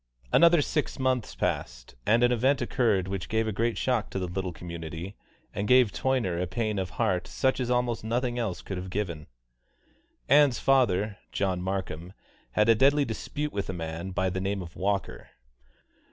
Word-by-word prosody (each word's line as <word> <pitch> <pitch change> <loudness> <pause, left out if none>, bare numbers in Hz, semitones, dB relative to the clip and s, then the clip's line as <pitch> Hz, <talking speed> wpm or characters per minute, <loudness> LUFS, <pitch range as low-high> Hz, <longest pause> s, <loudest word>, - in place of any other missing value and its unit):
Another 170 -2 +6
six 150 +1 -2
months 130 -3 0
passed, - - -3
and 115 +2 +4
an 120 - +4
event 130 +3 +2
occurred 110 -8 +1
which 95 -2 -4
gave 110 0 +1
a - - 0
great 115 +3 0
shock 125 -5 0
to - - -4
the 95 - -1
little 90 +1 -3
community 85 +2 -7 0.4
and 100 - -2
gave 125 -3 +5
Toyner 115 -11 0
a 90 - -1
pain 110 -1 -1
of 95 -2 -2
heart 90 -1 +1
such 130 0 0
as 125 -1 -1
almost 125 -2 0
nothing 120 +2 -1
else 110 -7 -3
could 95 - -5
have 90 +1 -5
given. 90 -6 -3 1.0
Ann's 140 -2 +5
father, 105 -6 +2
John 95 -2 -1
Markham, 90 -2 -4 0.4
had 105 +1 +3
a 115 - +7
deadly 140 +5 +4
dispute 145 +6 -4
with 100 -1 -3
a - - -2
man 85 +1 -5
by 95 0 0
the 95 +1 -3
name 100 0 -2
of 85 - -11
Walker. 100 +1 -2
105 Hz, 180 wpm, -28 LUFS, 90-125 Hz, 1.0 s, a